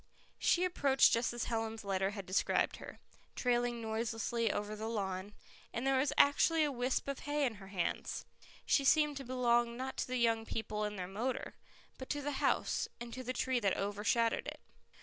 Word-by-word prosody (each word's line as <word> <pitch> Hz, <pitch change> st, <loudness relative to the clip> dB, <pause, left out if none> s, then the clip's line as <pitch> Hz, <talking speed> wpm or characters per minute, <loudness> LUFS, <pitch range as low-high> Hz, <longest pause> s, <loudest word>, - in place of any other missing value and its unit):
She 355 Hz, +1 st, +3 dB
approached 280 Hz, -7 st, +4 dB
just 230 Hz, +1 st, +2 dB
as 240 Hz, -1 st, -3 dB
Helen's 225 Hz, -1 st, -2 dB
letter 195 Hz, -1 st, 0 dB
had 200 Hz, -2 st, -6 dB
described 185 Hz, +2 st, +1 dB
her, -, -, -10 dB, 0.4 s
trailing 240 Hz, -1 st, 0 dB
noiselessly 225 Hz, 0 st, -1 dB
over 210 Hz, +1 st, -3 dB
the 215 Hz, +1 st, -4 dB
lawn, 195 Hz, -2 st, -3 dB, 0.4 s
and 235 Hz, -, -3 dB
there 270 Hz, -1 st, +3 dB
was 280 Hz, -, +2 dB
actually 315 Hz, +3 st, +5 dB
a 295 Hz, -, +1 dB
wisp 250 Hz, +1 st, -1 dB
of 280 Hz, -1 st, -3 dB
hay 290 Hz, 0 st, 0 dB
in 230 Hz, -5 st, -2 dB
her 195 Hz, -, -10 dB
hands. 185 Hz, -4 st, -2 dB, 0.4 s
She 280 Hz, -, +3 dB
seemed 300 Hz, +1 st, +4 dB
to 275 Hz, -, -5 dB
belong 240 Hz, -2 st, +1 dB
not 260 Hz, +1 st, -4 dB
to -, -, -1 dB
the 255 Hz, 0 st, -1 dB
young 230 Hz, -2 st, +2 dB
people 215 Hz, -1 st, -3 dB
and 210 Hz, -1 st, -4 dB
their 180 Hz, -, -3 dB
motor, 225 Hz, +7 st, -3 dB, 0.5 s
but 260 Hz, -, -7 dB
to 290 Hz, -1 st, -2 dB
the 285 Hz, -1 st, -3 dB
house, -, -, +1 dB
and 240 Hz, -1 st, -7 dB
to 255 Hz, -, -5 dB
the 255 Hz, -, -2 dB
tree 255 Hz, 0 st, 0 dB
that 200 Hz, -4 st, +1 dB
overshadowed 210 Hz, +3 st, 0 dB
it. -, -, -6 dB
235 Hz, 190 wpm, -34 LUFS, 210-260 Hz, 0.5 s, actually